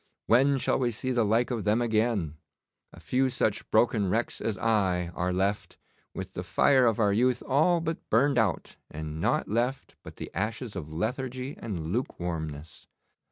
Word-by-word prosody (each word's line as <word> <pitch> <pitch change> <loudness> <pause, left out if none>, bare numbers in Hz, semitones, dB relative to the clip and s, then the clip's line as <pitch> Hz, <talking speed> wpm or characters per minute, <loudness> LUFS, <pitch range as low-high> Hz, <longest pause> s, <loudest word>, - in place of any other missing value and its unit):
When 135 +4 +4
shall 135 - +1
we 125 -2 +1
see 125 +3 -3
the 120 -2 +2
like 115 +4 +1
of 115 -4 -2
them 105 +2 +2
again? 110 -9 0 0.5
A - - -14
few 130 +1 +1
such 110 -4 -1
broken 110 -3 +2
wrecks 115 +5 -1
as 110 -3 -2
I 95 -6 +1
are 90 +1 -1
left, 95 +3 -1 0.4
with 95 0 -6
the - - -4
fire 130 +8 +3
of 115 -1 +1
our 105 -2 +3
youth 125 +3 +2
all 155 +6 +3
burned 140 -5 +1
out 105 -6 -1
and 80 0 -6
nought - - +1
left 120 +5 -2
but - - -11
the - - -8
ashes 115 0 -3
of 80 -5 -6
lethargy 125 - -3
and 85 -6 -5
lukewarmness. 85 - -4
110 Hz, 165 wpm, -28 LUFS, 95-125 Hz, 0.5 s, When